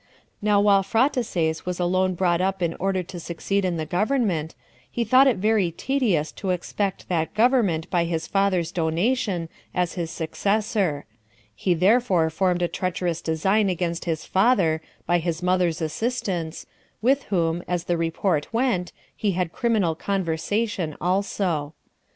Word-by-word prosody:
Now 205 -1 +3
while 200 -1 +5
Phraataces 205 - 0
was 180 -1 -2
alone 185 +1 +1
brought 175 -1 +1
up 190 -1 0
in 165 -1 0
order 190 0 0
to 175 +1 -8
succeed 175 +4 -2
in 180 -2 0
the 160 - -2
government, 185 - 0 0.3
he 240 - -1
thought 255 +5 +5
it 255 - +3
very 210 -2 +2
tedious 195 - 0
to 195 - -5
expect 190 +2 -2
that 165 +1 -1
government 215 -9 +2
by 175 -2 +2
his 165 -1 -2
father's 190 -4 +1
donation 175 +2 0 0.3
[as 180 -2 0
his 170 -3 -3
successor]; 195 -1 -1 0.5
he 175 - 0
therefore 185 -3 +3
formed 180 +1 +1
a - - +2
treacherous 180 -2 -2
design 190 +6 +1
against 175 -1 -2
his 160 -2 -2
father, 190 -7 +2 0.2
by 175 0 +2
his 170 0 -3
mother's 180 -3 +1
assistance, 175 -2 -3 0.4
with 270 +3 +3
whom, 170 -3 0
as 175 -1 -1
the 175 - 0
report 165 -1 -1
went, 230 -7 0 0.2
he 205 -3 0
had 175 -2 -1
criminal 220 -9 +1
conversation 185 0 -2
also. 180 -5 -1
180 Hz, 145 wpm, -24 LUFS, 165-205 Hz, 0.5 s, while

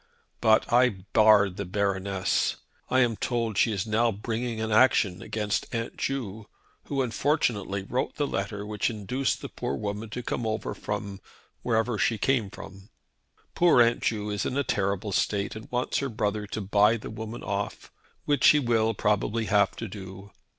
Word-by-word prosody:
But 110 +1 +3
I 125 +1 +6 0.2
barred 105 -4 +5
the 100 - -2
Baroness. 95 0 0 0.3
I 130 +1 +4
am 120 -3 +2
told 115 0 -1
that 100 - -1
she 115 - +4
is 100 0 -2
now 115 +2 +2
bringing 115 +2 -3
an 110 0 -2
action 105 -5 +4
against 105 -2 -2
Aunt 115 0 -3
Ju, 110 -6 -4 0.4
who 135 -2 -1
unfortunately 115 -6 0
wrote 125 +6 -2
the 145 - 0
letter 100 -4 -3
which 105 +2 -1
induced 115 +5 -2
the - - -5
woman 105 +8 -3
to 125 +4 -5
come 115 -1 -2
over 110 0 -2
from 100 -1 -5 0.4
wherever 115 -1 0
she 115 - +2
came 115 -2 +1
from. 95 +1 -11 0.6
Poor 170 -7 +4
Aunt 120 0 +4
Ju 105 -2 -1
is 105 - -2
in 130 - -2
a 140 - +2
terrible 100 -2 -1
state, 100 +1 0
and 110 - -9
wants 125 +1 -1
her 140 - -2
brother 105 -2 -2
to 110 - -4
buy 105 +3 +3
the 110 - -8
woman 110 +1 -7
off, 100 0 -4 0.3
which 145 -1 +3
he 150 - +6
will 115 -4 +1
probably 105 +2 0
have 100 +1 +2
to 115 - -5
do. 95 0 -10
110 Hz, 170 wpm, -27 LUFS, 100-120 Hz, 0.6 s, I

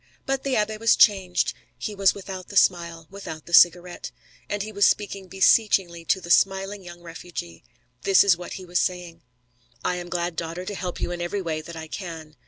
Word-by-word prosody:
But 270 -1 -1
the 270 -2 -1
abbé 215 0 0
was 225 0 +4
changed. 190 -4 +3 0.2
He 215 - -5
was 195 -1 +3
without 190 -2 -8
the 200 - -4
smile, 170 -3 +2
without 175 -6 -8
the 170 - -11
cigarette. 175 +1 +4 0.4
And 205 -1 -2
he 215 - -7
was 200 -1 +4
speaking 200 -2 -1
beseechingly 185 -2 +2
to 190 - +2
the 175 -1 -6
smiling 195 +2 +2
young 175 -1 -11
refugee. 165 - -8 0.4
This 195 +6 +5
is 200 -4 +5
what 175 +1 -8
he 185 - -8
was 175 0 0
saying: 180 -2 -3 0.6
"I 180 - 0
am 175 0 -7
glad, 175 -1 -2
daughter, 170 +3 -5
to 205 - -5
help 180 -2 -5
you - - -2
in 175 0 -4
every 190 +3 -3
way 160 -2 -2
that 170 +2 -10
I 160 -1 -7
can. 160 -4 -8
180 Hz, 200 wpm, -24 LUFS, 170-200 Hz, 0.6 s, This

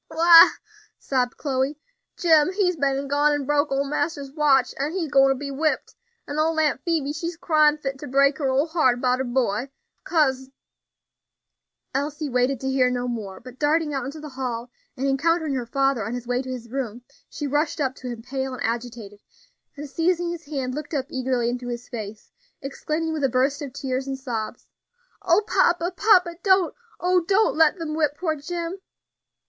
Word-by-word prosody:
"Why," 335 +1 +8 0.4
sobbed 250 -3 -1
Chloe, 275 0 -1 0.4
"Jim, 320 -1 +4
he's 370 -3 +1
been 275 -3 0
an' 280 0 -4
gone 290 +1 +3
an' 290 -2 -2
broke 290 +1 +1
ole 275 +1 +1
master's 290 -1 -2
watch, 275 -4 +3
an' 290 +4 -1
he's 335 -6 -3
gwine 270 -1 +4
be 280 +1 -5
whipped, 310 +3 -1 0.3
an' 290 +1 -3
old 320 +1 +1
Aunt 295 -4 +1
Phoebe 310 -4 -1
she's 335 +2 -4
cryin' 305 -3 +3
fit 270 -2 -5
to 290 - -7
break 275 +2 +3
her 275 -3 0
ole 265 +3 +2
heart 310 -7 +2
'bout 250 0 +1
her - - 0
boy, 245 -1 -1 0.3
kase 265 -5 +1 0.7
" - - -58
Elsie 290 +2 -2
waited 250 +1 +1
to 265 - -3
hear 260 -1 +3
no 250 0 -2
more, 210 -6 -5
but 255 +1 -13
darting 300 0 +1
out 270 - -2
into 285 +3 -7
the 300 0 -8
hall, 250 -2 -5 0.3
and 270 +2 -1
encountering 315 +2 +1
her 250 -3 -3
father 270 -2 +1
on 225 +4 -4
his 245 -1 -6
way 245 +1 0
to 260 - -8
his 240 -3 -7
room, 245 -3 -4 0.3
she 295 - -5
rushed 295 +3 0
up 265 -3 0
to 260 - -9
him, 235 -2 -6
pale 265 +1 -4
and - - -6
agitated, 230 -3 -4 0.6
and 295 +1 -6
seizing 340 +3 0
his 340 -2 -7
hand, 270 -4 -3
looked 300 +2 -5
up 270 -2 -1
eagerly 255 -4 -1
into 245 +1 -3
his 240 0 -5
face, 215 -2 -8 0.3
exclaiming 310 +4 -3
with 305 -2 -3
a 270 - +3
burst 265 +4 +1
of 280 -3 -5
tears 265 -1 -3
and 270 0 -3
sobs, 235 -5 -5 0.6
"O 375 +1 +3
papa, 345 -1 +2
papa! 360 -5 +4
don't, 380 -3 +3 0.3
oh! 360 +1 +3
don't 400 +5 +2
let 320 +2 +4
them 325 -3 -4
whip 300 -2 0
poor 320 -4 -1
Jim." 340 +4 -5
275 Hz, 190 wpm, -24 LUFS, 255-315 Hz, 0.7 s, Why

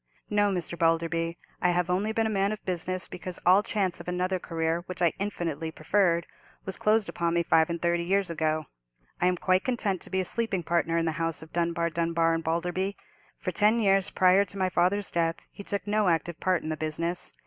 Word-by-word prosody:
"No, 205 -1 +3
Mr. 175 -2 -3
Balderby, 165 0 +1 0.2
I 180 - +3
have 175 0 +1
only 190 +4 0
been 225 0 +1
a - - +1
man 200 0 +1
of 215 - -6
business 185 0 -2
because 180 0 -7
all 185 +3 +7
chance 200 -4 -1
of - - -10
another 180 +1 -1
career, 165 0 -1
which 185 -1 -6
I 170 -2 +3
infinitely 165 -6 -3
preferred, 170 +1 +1 0.4
was 190 - -4
closed 215 -1 +2
upon 170 0 -1
me 170 - +2
five 160 -1 +3
and 170 0 -2
thirty 170 0 +1
years 190 0 +1
ago. 155 -1 0 0.6
I 180 - +4
am 180 0 +1
quite 185 +1 +2
content 215 -7 -1
to - - -9
be 190 - 0
a 185 - 0
sleeping 200 -4 -1
partner 165 0 +1
in 165 - +1
the 160 - +1
house 165 -2 -2
of 160 - -15
Dunbar, 170 -1 0
Dunbar, 165 0 +1
and 165 0 -1
Balderby. 180 +4 -1 0.4
For - - -3
ten 215 +3 +3
years 195 -3 +3
prior 185 +2 +4
to 200 0 -9
my 185 -1 +1
father's 185 +3 +1
death 165 0 -1
he - - -10
took 200 0 -3
no 210 -1 +1
active 170 0 0
part 185 -3 +1
in 155 - -4
the 155 - -2
business. 165 +3 -3
175 Hz, 215 wpm, -28 LUFS, 165-195 Hz, 0.6 s, all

